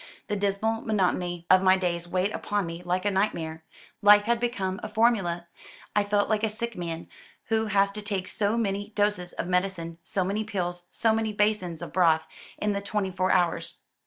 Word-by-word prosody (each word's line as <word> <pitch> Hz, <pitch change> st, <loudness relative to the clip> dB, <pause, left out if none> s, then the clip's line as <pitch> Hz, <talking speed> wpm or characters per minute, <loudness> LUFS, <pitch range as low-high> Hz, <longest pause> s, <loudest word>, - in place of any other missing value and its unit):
The 210 Hz, -, 0 dB
dismal 205 Hz, +3 st, 0 dB
monotony 180 Hz, -4 st, 0 dB
of 185 Hz, 0 st, +7 dB
my 190 Hz, 0 st, +5 dB
days 175 Hz, -2 st, -2 dB
weighed 185 Hz, +3 st, 0 dB
upon 205 Hz, -3 st, -1 dB
me 165 Hz, +1 st, -6 dB
like 180 Hz, +2 st, -1 dB
a 205 Hz, -, +3 dB
nightmare. 165 Hz, -5 st, -1 dB, 0.4 s
Life 205 Hz, 0 st, +7 dB
had 235 Hz, +2 st, +1 dB
become 205 Hz, -6 st, -2 dB
a -, -, -5 dB
formula. 195 Hz, -7 st, +1 dB, 0.5 s
I 210 Hz, -, +4 dB
felt 205 Hz, 0 st, +1 dB
like 215 Hz, -1 st, 0 dB
a 220 Hz, -, +2 dB
sick 235 Hz, +2 st, -4 dB
man 170 Hz, -1 st, -5 dB, 0.4 s
who 220 Hz, 0 st, +1 dB
has 200 Hz, -1 st, +3 dB
to 210 Hz, +1 st, -6 dB
take 200 Hz, -3 st, -3 dB
so 215 Hz, +1 st, 0 dB
many 205 Hz, -1 st, -2 dB
doses 205 Hz, -4 st, 0 dB
of -, -, -3 dB
medicine, 180 Hz, -2 st, -1 dB
so 185 Hz, +2 st, -1 dB
many 200 Hz, +4 st, -1 dB
pills, 175 Hz, -4 st, -4 dB
so 225 Hz, -1 st, +2 dB
many 220 Hz, -1 st, -1 dB
basins 205 Hz, -6 st, 0 dB
of -, -, -8 dB
broth, 160 Hz, -3 st, +3 dB, 0.3 s
in 210 Hz, 0 st, 0 dB
the 200 Hz, -, -2 dB
twenty 200 Hz, -1 st, -2 dB
four 185 Hz, +1 st, 0 dB
hours. 175 Hz, -2 st, 0 dB
195 Hz, 190 wpm, -27 LUFS, 180-210 Hz, 0.5 s, of